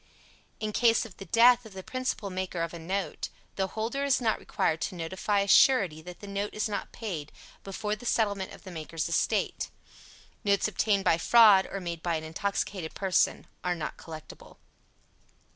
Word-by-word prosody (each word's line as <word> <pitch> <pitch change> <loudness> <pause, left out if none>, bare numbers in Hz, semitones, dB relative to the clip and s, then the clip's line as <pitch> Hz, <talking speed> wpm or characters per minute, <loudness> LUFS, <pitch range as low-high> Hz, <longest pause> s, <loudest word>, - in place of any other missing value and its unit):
In 215 0 -2
case 230 0 +3
of 205 -6 -13
the 195 - -8
death 240 +1 +6
of 220 -3 -12
the 190 0 -8
principal 255 -5 -3
maker 185 -2 -2
of 170 - -4
a 170 - -7
note, 185 0 -3 0.3
the 190 -1 0
holder 230 +6 -1
is 280 -2 +3
not 230 -3 +1
required 160 0 -1
to 190 - -2
notify 190 +4 -1
a 200 - -1
surety 195 - +5
that 180 +2 -11
the 205 - -8
note 200 +1 -3
is 215 - 0
not 205 - -4
paid, 170 -10 -5 0.3
before 210 +2 -3
the 235 +3 -8
settlement 200 -5 0
of - - -12
the 190 - -9
maker's 160 -1 -4
estate. 170 - 0 0.7
Notes 200 -1 +2
obtained 205 -1 +1
by 165 - +3
fraud, 210 -1 +7
or 195 - -3
made 170 -3 -5
by 170 -1 0
an 160 - -3
intoxicated 185 +1 -3
person, 190 -2 +1 0.2
are 180 0 0
not 160 - -4
collectible. 155 -2 -11
195 Hz, 180 wpm, -29 LUFS, 170-215 Hz, 0.7 s, fraud